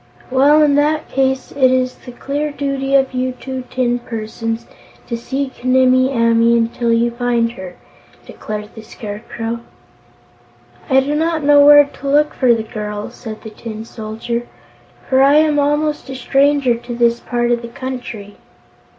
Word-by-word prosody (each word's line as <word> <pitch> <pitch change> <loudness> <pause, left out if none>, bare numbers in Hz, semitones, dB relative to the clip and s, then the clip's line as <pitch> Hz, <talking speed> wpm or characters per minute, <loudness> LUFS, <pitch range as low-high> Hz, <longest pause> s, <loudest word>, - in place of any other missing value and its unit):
"Well, 285 +4 +5
in 290 -1 +3
that 300 +1 +1
case, 265 -1 0
it 260 -2 +3
is 255 -1 +1
the 250 - -12
clear 285 +4 -3
duty 275 -1 -2
of 270 -1 +2
you 255 0 -1
two 260 0 -7
tin 245 -1 0
persons 225 0 -5 0.4
to 235 - -4
seek 265 +2 -5
Nimmie 255 0 +4
Amee 230 -1 +3
until 230 +1 0
you 230 +1 +2
find 235 -1 0
her," 185 -5 -9 0.5
declared 210 0 -7
the 220 - -10
Scarecrow. 225 +2 -6 1.3
"I 265 0 +5
do 285 +2 -2
not 320 0 0
know 290 0 +6
where 290 0 +9
to 280 0 -7
look 300 +1 +3
for 255 -3 +2
the 225 - -3
girl," 210 -1 -6
said 220 -3 -9
the 220 - -8
Tin 220 0 -8
Soldier, 230 +2 -5 0.6
"for 265 0 +3
I 280 +2 +5
am 305 -1 +3
almost 295 0 0
a 265 - -5
stranger 275 0 +2
to 240 +1 -6
this 235 0 +2
part 240 -1 -1
of 235 -1 +1
the 235 - -7
country." 235 -5 -7
255 Hz, 160 wpm, -17 LUFS, 230-275 Hz, 1.3 s, where